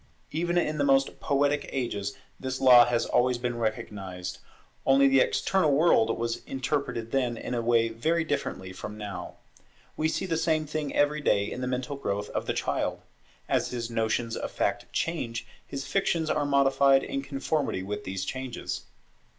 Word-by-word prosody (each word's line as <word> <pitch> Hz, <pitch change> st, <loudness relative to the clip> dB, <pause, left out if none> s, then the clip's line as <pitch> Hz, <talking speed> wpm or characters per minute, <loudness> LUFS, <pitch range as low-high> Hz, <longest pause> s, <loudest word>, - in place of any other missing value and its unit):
Even 175 Hz, +2 st, 0 dB
in 155 Hz, -3 st, +1 dB
the -, -, +3 dB
most 135 Hz, -1 st, +2 dB
poetic 145 Hz, +1 st, +1 dB
ages 100 Hz, -6 st, -3 dB, 0.2 s
this 130 Hz, 0 st, -3 dB
law 125 Hz, -2 st, +8 dB
has 120 Hz, -1 st, +1 dB
always 125 Hz, 0 st, +2 dB
been 120 Hz, -1 st, -3 dB
recognized, 95 Hz, -5 st, -4 dB, 0.4 s
only 135 Hz, +1 st, +5 dB
the 135 Hz, 0 st, +5 dB
external 185 Hz, +3 st, +2 dB
world 140 Hz, -7 st, +4 dB
was 115 Hz, 0 st, -2 dB
interpreted 130 Hz, -4 st, -2 dB
then 125 Hz, -3 st, 0 dB
in -, -, -5 dB
a 120 Hz, -, 0 dB
way 115 Hz, 0 st, +3 dB
very 160 Hz, +9 st, 0 dB
differently 95 Hz, -, -3 dB
from 105 Hz, +3 st, -7 dB
now. 100 Hz, -4 st, -6 dB, 0.6 s
We 155 Hz, -, +1 dB
see 175 Hz, +4 st, -1 dB
the 165 Hz, -3 st, 0 dB
same 160 Hz, -1 st, +1 dB
thing 150 Hz, -1 st, -3 dB
every 150 Hz, +1 st, +2 dB
day 100 Hz, -6 st, +2 dB
in 125 Hz, -, -5 dB
the 125 Hz, -, -2 dB
mental 130 Hz, +2 st, -2 dB
growth 105 Hz, -6 st, -3 dB
of -, -, -3 dB
the -, -, +1 dB
child. -, -, -1 dB, 0.5 s
As -, -, +1 dB
his 120 Hz, -1 st, -4 dB
notions 115 Hz, +1 st, 0 dB
of -, -, -3 dB
fact -, -, -1 dB
change, 120 Hz, -9 st, -2 dB, 0.2 s
his 140 Hz, 0 st, -5 dB
fictions 170 Hz, -5 st, 0 dB
are 150 Hz, -1 st, +1 dB
modified 135 Hz, -1 st, +4 dB
in 135 Hz, -, -3 dB
conformity 135 Hz, -6 st, -2 dB
with 105 Hz, +2 st, -4 dB
these 95 Hz, 0 st, -3 dB
changes. 130 Hz, 0 st, -4 dB
130 Hz, 170 wpm, -28 LUFS, 115-145 Hz, 0.6 s, law